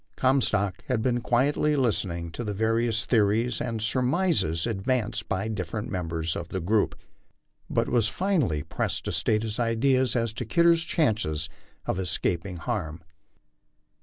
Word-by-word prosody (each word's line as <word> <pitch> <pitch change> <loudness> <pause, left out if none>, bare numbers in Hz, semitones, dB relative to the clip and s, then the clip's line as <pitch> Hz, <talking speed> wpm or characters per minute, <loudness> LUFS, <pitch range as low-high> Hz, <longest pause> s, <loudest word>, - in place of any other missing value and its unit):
Comstock 130 -7 +1
had 125 -4 0
been 120 -1 +1
quietly 140 +5 +2
listening 90 - 0
to 120 - -5
the 105 -2 -3
various 115 +1 +1
theories 115 +1 +2
and 115 -3 -2
surmises 125 - +1
advanced 110 0 -1
by 95 +3 -1
different 105 0 -4
members 80 -3 -2
of 85 - -5
the 95 - -3
group, 100 +5 +1 0.7
but - - +1
was 115 -3 +2
finally 145 - 0
pressed - - -2
to - - -2
state 105 0 +1
his 110 0 -3
ideas 125 +2 +2
as 115 -2 0
to 125 - -4
Kidder's 170 +7 +3
chances 105 - 0 0.4
of - - -1
escaping 90 +1 -1
harm. 80 0 -4
110 Hz, 140 wpm, -26 LUFS, 95-125 Hz, 0.7 s, Kidder's